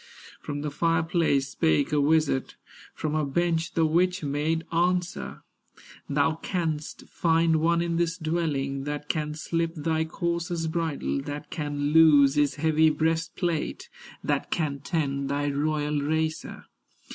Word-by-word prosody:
From 145 Hz, -1 st, -5 dB
the 150 Hz, 0 st, -3 dB
fire 165 Hz, +2 st, +1 dB
place 160 Hz, -5 st, +1 dB
spake 80 Hz, -, +1 dB
a 150 Hz, -1 st, +2 dB
wizard, 150 Hz, -2 st, +1 dB, 0.4 s
From 155 Hz, -1 st, -3 dB
her 155 Hz, -1 st, +1 dB
bench 165 Hz, +3 st, 0 dB
the 165 Hz, -, +3 dB
witch 180 Hz, +3 st, +1 dB
made 150 Hz, +3 st, -1 dB
answer: 175 Hz, +1 st, -1 dB, 0.7 s
"Thou 145 Hz, +3 st, +1 dB
canst 160 Hz, -4 st, -3 dB
find 165 Hz, -1 st, +2 dB
one 170 Hz, +2 st, +2 dB
in 170 Hz, -1 st, -1 dB
this 170 Hz, -1 st, 0 dB
dwelling, 150 Hz, -5 st, -2 dB
That 150 Hz, 0 st, -5 dB
can 150 Hz, -1 st, -1 dB
slip 165 Hz, +1 st, -2 dB
thy 160 Hz, +1 st, 0 dB
courser's 170 Hz, 0 st, -2 dB
bridle, 160 Hz, -, -2 dB
That 145 Hz, +1 st, -7 dB
can 145 Hz, -2 st, -2 dB
loose 150 Hz, -4 st, +7 dB
his 145 Hz, -2 st, +2 dB
heavy 160 Hz, +1 st, +3 dB
breastplate, 160 Hz, +1 st, -1 dB, 0.3 s
That -, -, -1 dB
can 145 Hz, -4 st, -1 dB
tend 140 Hz, -2 st, -2 dB
thy 145 Hz, +1 st, 0 dB
royal 150 Hz, 0 st, 0 dB
racer. 160 Hz, +2 st, -2 dB
155 Hz, 135 wpm, -26 LUFS, 145-165 Hz, 0.7 s, loose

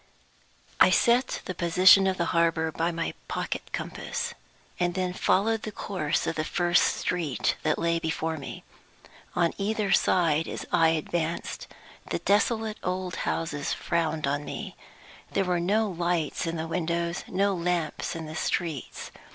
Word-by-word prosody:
I -, -, +8 dB
SET 245 Hz, +2 st, +3 dB
the 185 Hz, -, -3 dB
position 185 Hz, +3 st, +6 dB
of 190 Hz, -1 st, 0 dB
the 170 Hz, -, +1 dB
harbor 165 Hz, -1 st, +2 dB
by 165 Hz, +3 st, 0 dB
my 165 Hz, 0 st, -3 dB
pocket -, -, -4 dB
compass, -, -, -4 dB, 0.5 s
and 175 Hz, 0 st, +1 dB
then 185 Hz, -1 st, -1 dB
followed 220 Hz, +4 st, +2 dB
the 215 Hz, -, -5 dB
course 175 Hz, -7 st, -1 dB
of 165 Hz, -, -2 dB
the 155 Hz, -, +1 dB
first 175 Hz, +2 st, +2 dB, 0.2 s
street 165 Hz, -7 st, 0 dB
that -, -, +1 dB
lay 170 Hz, 0 st, +1 dB
before 160 Hz, 0 st, -2 dB
me. 140 Hz, -, -8 dB, 0.7 s
On 170 Hz, -1 st, +2 dB
either 210 Hz, 0 st, 0 dB
side, 165 Hz, -3 st, +3 dB
as -, -, -5 dB
I 165 Hz, -, +5 dB
advanced, 165 Hz, +1 st, -2 dB, 0.4 s
the -, -, 0 dB
desolate 220 Hz, +1 st, +1 dB
old 180 Hz, -1 st, -2 dB
houses 150 Hz, -3 st, -2 dB
frowned 160 Hz, -3 st, -1 dB
on 145 Hz, +1 st, -1 dB
me. -, -, -6 dB, 0.6 s
There 195 Hz, -, +2 dB
were 180 Hz, -1 st, +1 dB
no 210 Hz, +5 st, +2 dB
lights 175 Hz, -3 st, -1 dB
in 165 Hz, -, -2 dB
the 160 Hz, 0 st, -3 dB
windows, 170 Hz, 0 st, -1 dB
no 195 Hz, +2 st, +1 dB
lamps 170 Hz, -4 st, -1 dB
in 165 Hz, -1 st, -5 dB
the 155 Hz, +1 st, -7 dB
streets. 160 Hz, -4 st, -3 dB
170 Hz, 150 wpm, -27 LUFS, 165-185 Hz, 0.7 s, I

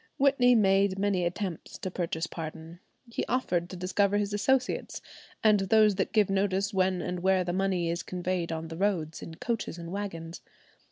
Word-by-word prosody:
Whitney 265 Hz, -3 st, +4 dB
made 195 Hz, -2 st, +3 dB
many 195 Hz, -3 st, +1 dB
attempts 180 Hz, -1 st, -4 dB
to 185 Hz, -, -5 dB
purchase 165 Hz, -2 st, -2 dB
pardon. 165 Hz, +1 st, -8 dB, 0.3 s
He 235 Hz, -, -3 dB
offered 180 Hz, -9 st, 0 dB
to -, -, -7 dB
discover 195 Hz, +3 st, +1 dB
his 205 Hz, 0 st, -1 dB
associates, 255 Hz, +5 st, 0 dB, 0.4 s
and 215 Hz, -2 st, +5 dB
those 210 Hz, +2 st, +4 dB
that 190 Hz, -1 st, -1 dB
give 210 Hz, -2 st, +4 dB
notice 195 Hz, +1 st, 0 dB
when 185 Hz, -1 st, +1 dB
and 180 Hz, 0 st, -3 dB
where 190 Hz, 0 st, +3 dB
the 175 Hz, 0 st, -2 dB
money 185 Hz, -2 st, 0 dB
is 170 Hz, +1 st, -1 dB
conveyed 180 Hz, -1 st, -2 dB
on 160 Hz, 0 st, -4 dB
the 165 Hz, -, -7 dB
roads 175 Hz, -5 st, -1 dB
in 165 Hz, -, -8 dB
coaches 225 Hz, -3 st, -3 dB
and 170 Hz, 0 st, -7 dB
wagons. 175 Hz, -4 st, -5 dB
190 Hz, 175 wpm, -29 LUFS, 175-205 Hz, 0.4 s, and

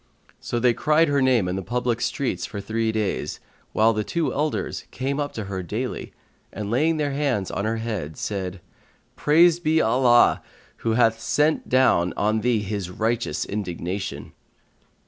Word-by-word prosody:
So 120 Hz, -, -3 dB
they 120 Hz, 0 st, +4 dB
cried 155 Hz, +4 st, +3 dB
her 140 Hz, -1 st, +2 dB
name 125 Hz, -7 st, +3 dB
in 90 Hz, -, -2 dB
the 95 Hz, -, -2 dB
public 120 Hz, +2 st, -1 dB
streets 120 Hz, -12 st, -1 dB
for 100 Hz, -, -6 dB
three 110 Hz, +2 st, -1 dB
days, 110 Hz, -2 st, -2 dB, 0.3 s
while 110 Hz, +1 st, +3 dB
the 105 Hz, 0 st, -1 dB
two 165 Hz, +7 st, -1 dB
elders 150 Hz, +2 st, -2 dB
came 135 Hz, +2 st, -3 dB
up 145 Hz, -1 st, -2 dB
to 110 Hz, -, -4 dB
her 95 Hz, -1 st, -4 dB
daily 85 Hz, -, -4 dB, 0.4 s
and, 105 Hz, 0 st, -5 dB
laying 155 Hz, +7 st, +2 dB
their 145 Hz, -2 st, 0 dB
hands 135 Hz, -9 st, -1 dB
on 100 Hz, -, -2 dB
her 110 Hz, +1 st, 0 dB
head, 105 Hz, -10 st, -4 dB
said, 95 Hz, -3 st, -4 dB, 0.5 s
"Praised 170 Hz, +3 st, +4 dB
be 160 Hz, 0 st, +3 dB
Allah 120 Hz, -1 st, +4 dB, 0.4 s
who 115 Hz, -, -1 dB
hath 115 Hz, -1 st, +3 dB
sent 150 Hz, +6 st, +1 dB
down 125 Hz, -9 st, +3 dB
on 110 Hz, +1 st, +1 dB
thee 120 Hz, -3 st, +1 dB
His 100 Hz, -3 st, -3 dB
righteous 115 Hz, +5 st, -1 dB
indignation!" 95 Hz, -5 st, -4 dB
115 Hz, 165 wpm, -24 LUFS, 100-135 Hz, 0.5 s, they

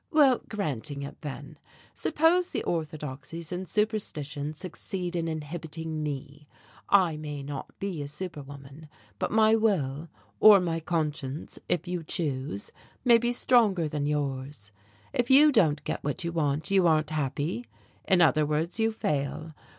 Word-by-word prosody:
"Well, 280 Hz, -5 st, +5 dB
granting 145 Hz, -, -3 dB
it, 140 Hz, -, -9 dB
then. 145 Hz, -3 st, -8 dB, 0.3 s
Suppose 330 Hz, +4 st, +2 dB
the -, -, -2 dB
orthodoxies 155 Hz, 0 st, -4 dB
and 180 Hz, -1 st, -4 dB
superstitions 155 Hz, -9 st, -2 dB
succeed 180 Hz, +1 st, -5 dB
in 165 Hz, -1 st, -1 dB
inhibiting 160 Hz, 0 st, -5 dB
me. 145 Hz, 0 st, -5 dB, 0.4 s
I 180 Hz, -6 st, +4 dB
may 150 Hz, -2 st, -6 dB
not 140 Hz, -1 st, -7 dB
be 190 Hz, -6 st, -3 dB
a 145 Hz, -, -4 dB
superwoman, 145 Hz, -2 st, -8 dB, 0.3 s
but -, -, 0 dB
my 220 Hz, 0 st, +5 dB
will, 165 Hz, -9 st, 0 dB, 0.3 s
or 210 Hz, -2 st, +9 dB
my 165 Hz, -2 st, -1 dB
conscience, 150 Hz, -4 st, -3 dB
if 175 Hz, -, 0 dB
you 180 Hz, -1 st, -2 dB
choose, 140 Hz, -, -3 dB, 0.3 s
may 235 Hz, -2 st, +7 dB
be 240 Hz, +1 st, 0 dB
stronger 220 Hz, -9 st, +3 dB
than 145 Hz, -1 st, -2 dB
yours. 135 Hz, -6 st, -3 dB, 0.4 s
If 245 Hz, -3 st, 0 dB
you 295 Hz, +3 st, +8 dB
don't 160 Hz, -, +3 dB
get -, -, -3 dB
what 145 Hz, +5 st, -2 dB
you 170 Hz, -, -2 dB
want, 155 Hz, +1 st, -1 dB
you 190 Hz, -3 st, +5 dB
aren't 155 Hz, -1 st, +2 dB
happy. 155 Hz, -, -2 dB, 0.4 s
In 185 Hz, -2 st, +5 dB
other 155 Hz, -1 st, +4 dB
words, 155 Hz, +7 st, -1 dB
you 225 Hz, 0 st, +3 dB
fail. 155 Hz, -4 st, -2 dB
160 Hz, 145 wpm, -28 LUFS, 145-190 Hz, 0.4 s, or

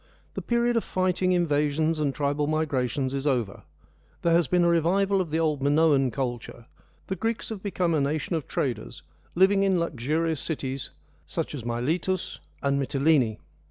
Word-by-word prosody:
The -, -, -4 dB
period 235 Hz, 0 st, +1 dB
of 230 Hz, -, +1 dB
fighting, 185 Hz, 0 st, 0 dB
invasions, 155 Hz, -2 st, +1 dB
and 145 Hz, -2 st, +1 dB
tribal 145 Hz, +1 st, -1 dB
migra 145 Hz, -5 st, 0 dB
tions 130 Hz, +1 st, -2 dB
is 140 Hz, +1 st, -2 dB
over: 120 Hz, -8 st, -1 dB, 0.6 s
there 170 Hz, -, +3 dB
has 170 Hz, -3 st, +3 dB
been 180 Hz, +3 st, +2 dB
a -, -, +4 dB
revival 190 Hz, +4 st, +2 dB
of 175 Hz, -, -4 dB
the 155 Hz, -, -1 dB
old 155 Hz, -4 st, 0 dB
Minoan 145 Hz, -2 st, +3 dB
culture, 120 Hz, -1 st, -5 dB, 0.4 s
the 190 Hz, -, -3 dB
Greeks 225 Hz, +2 st, -2 dB
have 215 Hz, -4 st, -6 dB
become 185 Hz, -4 st, 0 dB
a 155 Hz, -, +2 dB
nation 150 Hz, +4 st, -1 dB
of 155 Hz, -5 st, -3 dB
traders 115 Hz, -, -3 dB, 0.3 s
living 195 Hz, +2 st, +4 dB
in 190 Hz, -2 st, +2 dB
luxurious 160 Hz, +1 st, -1 dB
cities, 135 Hz, -4 st, -3 dB, 0.4 s
such -, -, -3 dB
as 135 Hz, -6 st, -6 dB
Miletus 155 Hz, +11 st, -2 dB, 0.2 s
and 140 Hz, 0 st, +1 dB
Mytilene. 135 Hz, -4 st, +2 dB
155 Hz, 165 wpm, -26 LUFS, 135-175 Hz, 0.6 s, a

